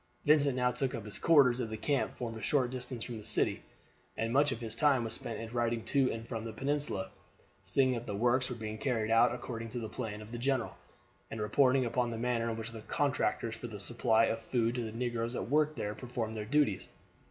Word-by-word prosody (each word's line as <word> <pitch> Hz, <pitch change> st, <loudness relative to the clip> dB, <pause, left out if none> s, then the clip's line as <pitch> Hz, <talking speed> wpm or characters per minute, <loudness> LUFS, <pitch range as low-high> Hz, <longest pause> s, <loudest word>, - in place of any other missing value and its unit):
Vincent 145 Hz, -3 st, +4 dB
now 125 Hz, -1 st, +2 dB
took 130 Hz, +2 st, -1 dB
up 115 Hz, -3 st, -6 dB
his 105 Hz, -, -7 dB
quarters 135 Hz, -7 st, +5 dB
at 115 Hz, -, -3 dB
the 110 Hz, -, -4 dB
camp 140 Hz, +5 st, -1 dB
formed 115 Hz, -2 st, -4 dB
a 110 Hz, -, -7 dB
short 125 Hz, +2 st, +1 dB
distance 125 Hz, -2 st, -5 dB
from 115 Hz, -2 st, -6 dB
the -, -, -11 dB
city, -, -, +2 dB, 0.6 s
and 115 Hz, +1 st, -1 dB
much 145 Hz, +1 st, +4 dB
of 115 Hz, -, -3 dB
his 115 Hz, -2 st, -3 dB
time 140 Hz, -2 st, +3 dB
was 115 Hz, -, 0 dB
spent 115 Hz, -, -3 dB
in 115 Hz, 0 st, -6 dB
riding 120 Hz, -1 st, 0 dB
to 135 Hz, +1 st, +2 dB
and 115 Hz, 0 st, -6 dB
from 115 Hz, -3 st, -4 dB
the 115 Hz, -, -5 dB
peninsula, 135 Hz, -6 st, -2 dB, 0.5 s
seeing 130 Hz, +7 st, +2 dB
that 120 Hz, -1 st, -3 dB
the 105 Hz, -, -3 dB
works 120 Hz, +4 st, +2 dB
were 125 Hz, -, -4 dB
being 110 Hz, -1 st, -6 dB
carried 115 Hz, -5 st, 0 dB
out 115 Hz, +2 st, +5 dB
according 120 Hz, -2 st, -5 dB
to 120 Hz, -, -6 dB
the 115 Hz, -2 st, -3 dB
plan 110 Hz, -2 st, -5 dB
of 105 Hz, +1 st, -10 dB
the 120 Hz, -, -5 dB
general, 130 Hz, -2 st, 0 dB, 0.5 s
and 115 Hz, -, -6 dB
reporting 130 Hz, +5 st, +3 dB
upon 120 Hz, +1 st, 0 dB
the 115 Hz, -, -4 dB
manner 115 Hz, -1 st, 0 dB
in 115 Hz, -, -3 dB
which 115 Hz, 0 st, -5 dB
the 110 Hz, -1 st, -8 dB
contractors 130 Hz, -3 st, 0 dB
for 120 Hz, -, -7 dB
the 105 Hz, -3 st, -8 dB
supply 115 Hz, +1 st, +3 dB
of 115 Hz, -, -2 dB
food 115 Hz, 0 st, 0 dB
to 125 Hz, -, -2 dB
the 110 Hz, -, -5 dB
negroes 120 Hz, 0 st, -2 dB
at 110 Hz, +3 st, -4 dB
work 155 Hz, +1 st, +3 dB
there 105 Hz, -5 st, -3 dB
performed 120 Hz, -2 st, -4 dB
their 105 Hz, -1 st, -4 dB
duties. 135 Hz, -5 st, +1 dB
120 Hz, 235 wpm, -32 LUFS, 110-130 Hz, 0.6 s, quarters